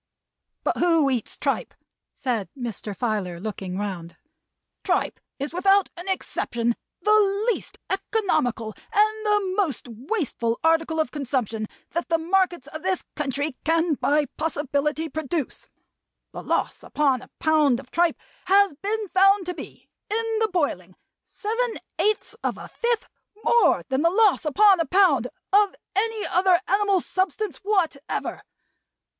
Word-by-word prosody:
"But -, -, 0 dB
who 330 Hz, -5 st, +3 dB
eats 245 Hz, -4 st, -2 dB
tripe?" -, -, -1 dB, 0.4 s
said 235 Hz, -7 st, -2 dB
Mr. 220 Hz, -4 st, -5 dB
Filer, 205 Hz, -8 st, -2 dB
looking 190 Hz, -2 st, -5 dB
round. 185 Hz, -5 st, -5 dB, 0.7 s
"Tripe -, -, 0 dB, 0.2 s
is 280 Hz, +3 st, -4 dB
without 390 Hz, +2 st, +3 dB
an 355 Hz, +2 st, -7 dB
exception 235 Hz, -10 st, -1 dB, 0.3 s
the 420 Hz, 0 st, +3 dB
least -, -, -7 dB
economical, 310 Hz, -, 0 dB, 0.2 s
and 430 Hz, 0 st, +2 dB
the 410 Hz, -3 st, +2 dB
most 340 Hz, -, -1 dB
wasteful 240 Hz, -, -2 dB
article 325 Hz, 0 st, +2 dB
of 315 Hz, -, 0 dB
consumption 245 Hz, -6 st, -2 dB, 0.2 s
that 340 Hz, +2 st, -3 dB
the 330 Hz, -, +3 dB
markets 350 Hz, -2 st, +1 dB
of 310 Hz, -, -7 dB
this 375 Hz, 0 st, -1 dB
country 285 Hz, 0 st, -1 dB
can 325 Hz, +1 st, +2 dB
by 295 Hz, +1 st, +2 dB
possibility 300 Hz, 0 st, -1 dB
produce. 310 Hz, -1 st, -4 dB, 0.6 s
The -, -, -7 dB
loss -, -, -1 dB
upon 275 Hz, -4 st, +1 dB
a -, -, -14 dB
pound 300 Hz, -6 st, +3 dB
of 265 Hz, -1 st, -13 dB
tripe 340 Hz, -1 st, +2 dB, 0.3 s
has 395 Hz, -1 st, +5 dB
been 420 Hz, +7 st, -3 dB
found 390 Hz, +1 st, +4 dB
to 360 Hz, -, -3 dB
be, -, -, -10 dB, 0.2 s
in 450 Hz, +1 st, -1 dB
the 445 Hz, -1 st, +2 dB
boiling, 185 Hz, -, -1 dB, 0.3 s
seven 460 Hz, +2 st, -2 dB, 0.2 s
eighths 425 Hz, 0 st, +1 dB
of -, -, -1 dB
a -, -, -9 dB
fifth 470 Hz, -1 st, -1 dB, 0.4 s
more 475 Hz, -, +4 dB
than 265 Hz, +1 st, +1 dB
the 335 Hz, -, +4 dB
loss 405 Hz, -2 st, +3 dB
upon 390 Hz, +5 st, +5 dB
a 330 Hz, -, 0 dB
pound 320 Hz, -, +4 dB, 0.3 s
of 405 Hz, -1 st, +4 dB, 0.2 s
any 440 Hz, +1 st, 0 dB
other 360 Hz, 0 st, +3 dB
animal 395 Hz, -1 st, +2 dB
substance 375 Hz, -2 st, -2 dB
whatever. 355 Hz, -8 st, -1 dB
330 Hz, 140 wpm, -24 LUFS, 265-395 Hz, 0.7 s, has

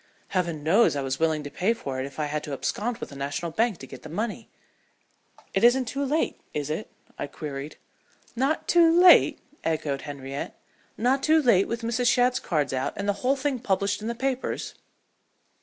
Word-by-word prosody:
Heaven 170 Hz, -5 st, -1 dB
knows 190 Hz, +4 st, +4 dB
I 140 Hz, -, -1 dB
was 135 Hz, 0 st, -2 dB
willing 160 Hz, -2 st, +1 dB
to 145 Hz, -, -7 dB
pay 205 Hz, +6 st, +1 dB
for 135 Hz, -11 st, -5 dB
it 130 Hz, -, -2 dB
if 140 Hz, -, -14 dB
I 150 Hz, -, +1 dB
had 150 Hz, +1 st, -3 dB
to 145 Hz, -, -5 dB
abscond 225 Hz, -, -2 dB
with -, -, -7 dB
a -, -, -10 dB
national 145 Hz, +5 st, -3 dB
bank 225 Hz, +1 st, +1 dB
to 135 Hz, -, -10 dB
get 130 Hz, -1 st, -11 dB
the 155 Hz, -, -10 dB
money." 215 Hz, +7 st, -4 dB, 1.0 s
"It 195 Hz, -, +1 dB
isn't 250 Hz, +2 st, +5 dB
too 275 Hz, +4 st, -3 dB
late, 295 Hz, +4 st, -1 dB
is 150 Hz, 0 st, -2 dB
it?" 165 Hz, +8 st, -4 dB, 0.3 s
I -, -, -2 dB
queried. 145 Hz, 0 st, -7 dB, 0.6 s
"Not 270 Hz, +6 st, 0 dB
too 340 Hz, -1 st, +6 dB
late?" 360 Hz, 0 st, +7 dB, 0.3 s
echoed 155 Hz, -4 st, -1 dB
Henriette. 140 Hz, -1 st, -6 dB, 0.4 s
"Not 255 Hz, +4 st, +2 dB
too 315 Hz, +2 st, +4 dB
late 235 Hz, -10 st, +4 dB
with 230 Hz, 0 st, -4 dB
Mrs. 235 Hz, +1 st, 0 dB
Shadd's 250 Hz, 0 st, +3 dB
cards 145 Hz, -6 st, -1 dB
out 130 Hz, 0 st, -1 dB
and 200 Hz, -, -4 dB
the 205 Hz, -, +3 dB
whole 260 Hz, +2 st, +3 dB
thing 275 Hz, -1 st, -1 dB
published 200 Hz, -2 st, 0 dB
in 215 Hz, -, -4 dB
the 235 Hz, -, -2 dB
papers?" 265 Hz, +1 st, -2 dB
195 Hz, 195 wpm, -26 LUFS, 145-245 Hz, 1.0 s, late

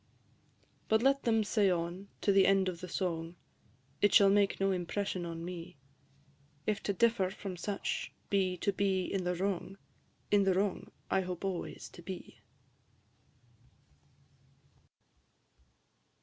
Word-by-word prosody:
But 220 Hz, +1 st, +3 dB
let 275 Hz, +1 st, +3 dB
them 225 Hz, -2 st, +3 dB
say 205 Hz, -1 st, +2 dB
on 175 Hz, +2 st, -2 dB
to 200 Hz, -, +3 dB
the 195 Hz, -1 st, +5 dB
end 195 Hz, -1 st, +4 dB
of 175 Hz, -2 st, -4 dB
the 180 Hz, -, -5 dB
song, 170 Hz, -2 st, -3 dB, 0.7 s
It 205 Hz, -, +5 dB
shall 200 Hz, -1 st, +7 dB
make 200 Hz, 0 st, +3 dB
no 195 Hz, 0 st, +2 dB
impression 185 Hz, 0 st, -2 dB
on 165 Hz, 0 st, -5 dB
me: 175 Hz, -1 st, -7 dB, 0.9 s
If 210 Hz, -1 st, 0 dB
to 200 Hz, -, -1 dB
differ 225 Hz, -2 st, +2 dB
from 195 Hz, -1 st, -6 dB
such 200 Hz, +3 st, -3 dB, 0.2 s
be 190 Hz, -2 st, +2 dB
to 200 Hz, +3 st, 0 dB
be 190 Hz, -2 st, +1 dB
in 190 Hz, -2 st, -2 dB
the 180 Hz, 0 st, 0 dB
wrong, 195 Hz, +1 st, -2 dB, 0.5 s
In 205 Hz, -1 st, +5 dB
the 190 Hz, -2 st, +3 dB
wrong 195 Hz, 0 st, -1 dB, 0.2 s
I 190 Hz, -, +3 dB
hope 180 Hz, 0 st, -5 dB
always 190 Hz, -3 st, -4 dB
to -, -, -13 dB
be. 185 Hz, +1 st, -8 dB
190 Hz, 135 wpm, -32 LUFS, 180-200 Hz, 0.9 s, shall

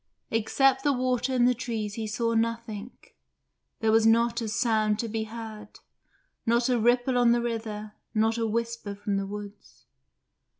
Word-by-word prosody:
Except 265 Hz, +4 st, +2 dB
the 285 Hz, -, +3 dB
water 255 Hz, 0 st, 0 dB
and 245 Hz, -1 st, +4 dB
the 250 Hz, -, +4 dB
trees 225 Hz, -4 st, -4 dB
he 220 Hz, 0 st, -4 dB
saw 230 Hz, +1 st, -1 dB
nothing; 230 Hz, -1 st, -2 dB, 0.9 s
there 220 Hz, -1 st, +3 dB
was 225 Hz, 0 st, +5 dB
not 235 Hz, +1 st, +3 dB
a 225 Hz, -, -2 dB
sound 215 Hz, -1 st, +1 dB
to 230 Hz, -, -2 dB
be 220 Hz, 0 st, -2 dB
heard, 220 Hz, -2 st, -9 dB, 0.6 s
not 235 Hz, +1 st, +2 dB
a 245 Hz, -2 st, +2 dB
ripple 245 Hz, +2 st, +3 dB
on 235 Hz, -1 st, +5 dB
the 240 Hz, -, +1 dB
river, 220 Hz, -3 st, -4 dB, 0.2 s
not 220 Hz, 0 st, +2 dB
a 225 Hz, -, +1 dB
whisper 230 Hz, -2 st, -3 dB
from 200 Hz, 0 st, -2 dB
the 195 Hz, 0 st, -2 dB
woods. 205 Hz, 0 st, -10 dB
225 Hz, 165 wpm, -27 LUFS, 215-235 Hz, 0.9 s, was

